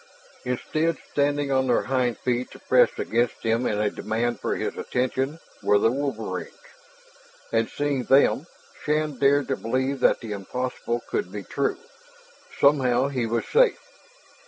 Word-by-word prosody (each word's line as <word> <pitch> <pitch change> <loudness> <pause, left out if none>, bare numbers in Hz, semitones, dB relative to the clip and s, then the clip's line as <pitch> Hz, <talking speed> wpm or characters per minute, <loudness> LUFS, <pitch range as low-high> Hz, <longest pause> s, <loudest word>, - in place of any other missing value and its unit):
Instead, 155 +6 -1
standing 145 0 +1
on 130 -1 +2
their 120 - +2
hind 125 -3 0
feet 125 0 -1
to - - -13
press - - +4
against 120 +1 -1
him 115 +2 +1
in 105 - 0
a 105 -1 +1
demand 115 +1 -2
for - - -1
his - - -3
attention, 130 +4 -2 0.2
were 105 - +4
the 115 +2 +3
wolverines. 115 -9 -3 1.0
And 115 0 +1
seeing 140 -4 -1
them, 140 +3 +4 0.4
Shann 150 -2 0
dared 140 0 +3
to 135 - +1
believe 130 +4 -1
that - - +3
the 115 - -7
impossible 120 +3 -3
could 90 - -2
be 100 0 -6
true; - - -1 0.8
somehow 135 -2 +3
he 125 -4 -1
was 115 +1 -1
safe. - - +4
125 Hz, 150 wpm, -25 LUFS, 115-140 Hz, 1.0 s, press